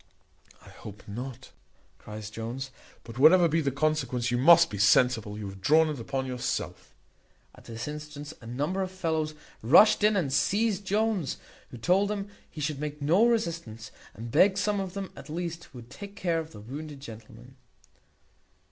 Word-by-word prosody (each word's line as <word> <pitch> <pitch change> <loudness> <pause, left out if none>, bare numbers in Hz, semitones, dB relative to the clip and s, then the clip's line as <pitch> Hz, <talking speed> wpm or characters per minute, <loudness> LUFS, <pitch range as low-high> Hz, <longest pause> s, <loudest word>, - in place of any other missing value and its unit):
"I - - -13
hope 105 -1 -11
not," 125 +4 -7 0.5
cries 105 0 -8
Jones, 120 +5 -5 0.3
"but 115 +1 -9
whatever 170 +4 +7
be 165 +1 +1
the 140 - 0
consequence, 135 -4 -1
you 120 - +1
must 170 +3 +7
be 105 - -5
sensible 105 0 +3
you 105 -2 -5
have 95 0 -10
drawn 155 +8 +4
it 150 -4 -4
upon 135 +3 -3
yourself." 125 - -4 0.6
At - - -18
this 115 +2 -6
instant 150 0 -7
a 115 - -11
number 145 +11 -2
of 190 - -2
fellows 160 -4 -2 0.3
rushed 170 - +6
in 210 0 +4
and 150 -9 0
seized 205 +3 +1
Jones, 205 - 0 0.3
who 125 - -10
told 185 - +2
them 200 -1 -4 0.2
he 155 - -8
should 150 -1 -2
make 150 0 -5
no 170 +11 +4
resistance, 165 - -2 0.2
and 115 +1 -8
begged 190 - +4
some 205 +1 0
of 190 -1 -5
them 195 -1 -5
at 140 - -12
least 170 +1 -5
would 120 -3 -12
take 200 0 -10
care 170 -3 0
of 160 0 -7
the 105 - -11
wounded 145 +5 -8
gentleman. 115 +1 -12
150 Hz, 175 wpm, -28 LUFS, 120-180 Hz, 0.6 s, whatever